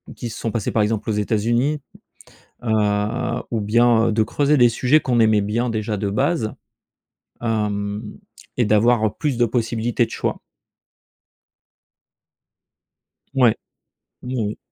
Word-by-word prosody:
qui 120 - -5
se 110 - -8
sont 115 - -2
passés, 115 -3 -2
par 110 - +1
exemple, 105 +1 -1
aux - - +1
États-Unis. 120 +7 0 0.8
Heu, 105 +2 0
ou 115 -2 -1
bien, 115 +2 +3
heu, - - +1
de 110 0 +2
creuser 145 +6 +1
les 120 -2 +6
sujets 125 +6 +3
qu'on 125 -5 0
aimait 110 -2 +4
bien 115 +5 -1
déjà 110 -1 -2
de 100 0 -2
base, 130 +2 0 0.9
hem, 105 -2 -2 0.5
et 125 - +2
d'avoir, 110 +2 +3
heu, - - 0
plus 145 -4 -1
de 120 - +4
possibilités 115 +1 0
de - - -19
choix. - - -3 2.9
Ouais, 125 -5 +4 0.7
oui, 125 +1 -5
oui. 105 -2 -2
115 Hz, 140 wpm, -21 LUFS, 105-120 Hz, 2.9 s, les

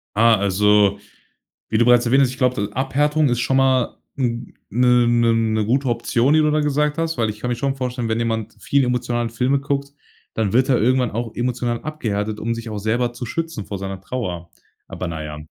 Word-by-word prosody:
Ah, 115 +1 +5
also, 100 0 +3 0.7
wie 110 - +1
du 120 - +4
bereits 120 0 +5
erwähnt 135 +3 +4
hast, 125 - +1
ich 130 - -9
glaube, 125 -1 +2
d 105 - -17
Abhärtung 145 +3 +1
ist 120 - 0
schon 130 +3 +1
mal 130 -2 +2 0.2
n 120 -3 -2 0.2
'ne 125 +1 +4
'ne 120 -1 +3
'ne 110 -1 +1
gute 130 +4 +1
Option, 120 +3 +1
die 155 - +5
du 150 -1 +3
da 150 0 +1
gesagt 150 +1 0
hast, 165 -3 -1
weil 110 -2 +1
ich 105 - -6
kann 125 - -3
mir 120 - 0
schon 135 +2 -1
vorstellen, 125 -3 -3
wenn 110 - 0
jemand 115 -1 -2
viel 140 -1 +1
emotionale 120 -1 -1
Filme 125 +4 +1
guckt, 140 0 -3 0.4
dann 110 -3 -1
wird 130 +3 +2
er 125 - +3
irgendwann 125 0 +2
auch 115 +1 -3
emotional 120 -1 -2
abgehärtet, 110 -8 -3
um 115 +1 -2
sich 115 -1 -7
auch 105 -1 -4
selber 120 +3 0
zu 120 +1 -6
schützen 165 -5 -4
vor 100 - -5
seiner 95 0 -6
Trauer. 90 -7 -5 0.4
Aber, 90 - -5
na 80 -2 -5
ja, 75 0 -7
120 Hz, 215 wpm, -21 LUFS, 110-130 Hz, 0.7 s, Ah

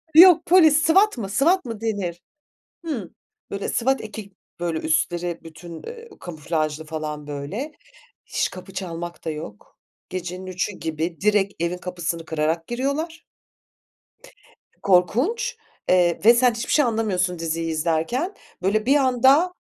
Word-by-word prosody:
Yok, 345 0 +9
polis. 320 -4 +6
SWAT 385 0 +4
mı, 200 -4 -4
SWAT 330 - +3
mı 225 -3 -6
denir? 190 -6 -2 0.6
Hımm. 245 - -4 0.4
Böyle, 200 0 -3
SWAT 265 +3 +1
eki 210 -2 -8 0.3
böyle, 170 -2 -1
üstleri 170 +2 0
bütün, 165 +1 -10
eee, 470 0 -9
kamuflajlı 155 -2 -3
falan, 155 -1 -5
böyle. 150 - -5 0.5
Hiç - - -1
kapı 185 +1 -10
çalmak 175 -3 -6
da 160 - -2
yok. 130 -10 -9 0.3
Gecenin 185 0 -5
3.00'ü 185 +2 -2
gibi 160 -1 -4
direkt 205 -1 +2
evin 175 +1 -1
kapısını 175 -2 -4
kırarak 160 +1 -1
giriyorlar. 280 +7 -3 1.6
Korkunç, 240 - +2 0.3
eee, 175 -2 +4
ve 235 - +9
sen 245 0 +4
hiçbir 230 +1 -4
şey 295 -3 +5
anlamıyorsun 185 -6 0
diziyi 165 0 -2
izlerken. 165 - 0 0.3
Böyle, 210 +4 +1
bir 275 +3 +4
anda 270 +6 +4
185 Hz, 130 wpm, -23 LUFS, 165-255 Hz, 1.6 s, Yok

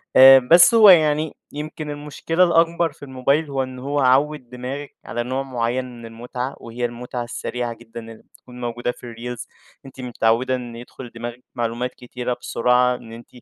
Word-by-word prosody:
آآ 135 0 +10
بس 170 - +6
هو 215 -2 +9
يعني 155 -3 +4 0.2
يمْكِن 150 +1 -6
المشكلة 150 +4 -1
الأكبر 165 -1 +2
في 145 - -17
الموبايل 140 +3 0
هو 135 -1 -1
إن 130 0 -8
هو 140 +2 -2
عوّد 135 0 +2
دماغِك 130 +3 -7
على 120 0 -3
نوع 130 +2 -2
معين 125 0 -2
من 115 - -10
المتعة، 125 +3 -6
وهي 120 +1 -4
المتعة 120 +1 -5
السريعة 120 0 -4
جدًا 115 0 -11
اللي 115 -1 -12
بتكُون 125 0 -14
موجودة 120 +1 -2
في 120 -1 -11
الreels. 120 0 -7 0.4
أنتِ 135 0 -11
متعودة 120 +1 +1
إن 120 -2 -7
يدخّل 120 +1 -10
دماغِك 120 +2 -7
معلومات 120 +1 -3
كتيرة 125 0 -5
بسرعة، 125 +1 +2
إن 115 -2 -12
أنتِ 115 +1 -11
125 Hz, 170 wpm, -21 LUFS, 120-140 Hz, 0.4 s, آآ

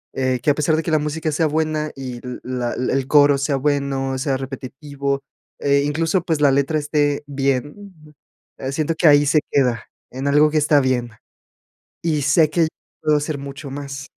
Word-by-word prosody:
eh, 130 -1 0
que 145 - +1
a 145 - +4
pesar 155 +1 +1
de 160 - 0
que - - -3
la 155 - +4
música 155 +1 -2
sea 160 +2 +1
buena, 155 0 -1
y 130 -3 -6
l 125 0 -6
la 125 -1 -3
el 130 +1 -1
coro 145 -1 +5
sea 140 0 0
bueno, 135 -1 -1
sea 135 +1 -1
repetitivo, 140 +1 -4 0.4
eh, 140 0 +3
incluso, 165 +4 0
pues, 160 -4 -1
la 145 -2 +5
letra 140 +3 +1
esté 145 -1 0
bien, 145 +4 -4 0.4
eh, 135 0 -4
siento 155 +3 -1
que 170 - +4
ahí 145 -1 +6
se 155 +1 +3
queda, 125 -5 +1 0.3
en 135 +2 -4
algo 150 +2 +5
que 155 - +1
está 150 -1 +4
bien, 125 -3 0 0.9
y 155 -3 0
sé 150 +3 +4
que 170 +1 +1
yo 160 - +3 0.3
puedo 150 -1 +3
hacer 145 0 -3
mucho 140 +1 -8
más. 140 0 -6
145 Hz, 190 wpm, -20 LUFS, 135-155 Hz, 0.9 s, ahí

